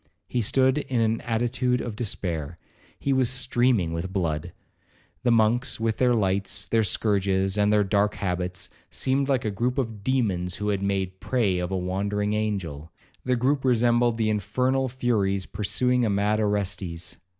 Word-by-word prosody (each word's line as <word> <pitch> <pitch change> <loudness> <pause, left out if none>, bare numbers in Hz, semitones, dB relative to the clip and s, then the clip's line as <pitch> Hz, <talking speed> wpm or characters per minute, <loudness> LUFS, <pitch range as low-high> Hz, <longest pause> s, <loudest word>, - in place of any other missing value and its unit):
He 125 - -1
stood 130 +5 +2
in 130 -4 -2
an 115 0 +1
attitude 120 +2 0
of 115 -3 -4
despair—he 85 - -4
was 130 -2 +2
streaming 125 -8 +1
with 85 +3 -4
blood. 85 -3 -2 0.7
The 125 - +1
monks, 115 +2 +2
with 110 -1 0
their 125 -1 +3
lights, 100 -2 0
their 115 - +2
scourges, 95 -1 +1
and 105 0 +3
their 105 -1 +4
dark 100 +1 +1
habits, 90 -1 -3 0.2
seemed 135 +1 0
like 130 -3 +1
a 105 - 0
groupe 120 +6 -1
of 115 -6 -3
demons 100 -9 0
who 105 0 -2
had 100 -2 0
made 95 -1 -2
prey 105 -8 0
of 90 0 -2
a 95 - -1
wandering 100 +3 -1
angel,—the 100 - -3
groupe 135 +3 +1
resembled 120 -1 +3
the 110 -1 +1
infernal 125 +6 0
furies 105 -7 0
pursuing 125 +4 0
a 110 - +2
mad 105 +2 +1
Orestes. 100 -5 -2
105 Hz, 155 wpm, -25 LUFS, 95-120 Hz, 0.7 s, their